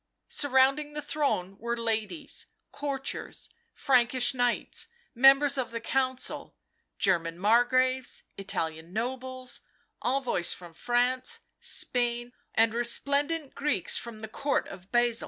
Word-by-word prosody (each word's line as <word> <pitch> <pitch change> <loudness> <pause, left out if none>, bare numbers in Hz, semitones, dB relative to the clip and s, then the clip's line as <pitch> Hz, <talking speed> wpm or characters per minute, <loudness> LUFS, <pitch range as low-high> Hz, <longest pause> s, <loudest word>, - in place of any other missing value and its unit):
Surrounding 280 +2 +3
the 300 - -4
throne 275 -11 -1
were 235 +1 -2
ladies, 230 +6 -2 0.2
courtiers, 275 -2 -4 0.2
Frankish 250 -1 +3
knights, 245 -2 -1 0.3
members 275 +2 +6
of 245 -3 -1
the 230 - -4
Council, 260 +2 -2 0.4
German 170 -3 +1
Margraves, 250 +5 +2
Italian 165 -3 -3
nobles, 255 +2 -3 0.4
envoys 250 -9 0
from 175 -2 -11
France, 250 - 0 0.2
Spain, 240 -1 0 0.2
and 225 0 +4
resplendent 280 +5 0
Greeks 280 - 0
from 230 -2 -5
the 220 - -5
Court 280 +6 -1
of 185 +1 -12
Basil. 240 -1 +3
245 Hz, 110 wpm, -29 LUFS, 225-270 Hz, 0.4 s, members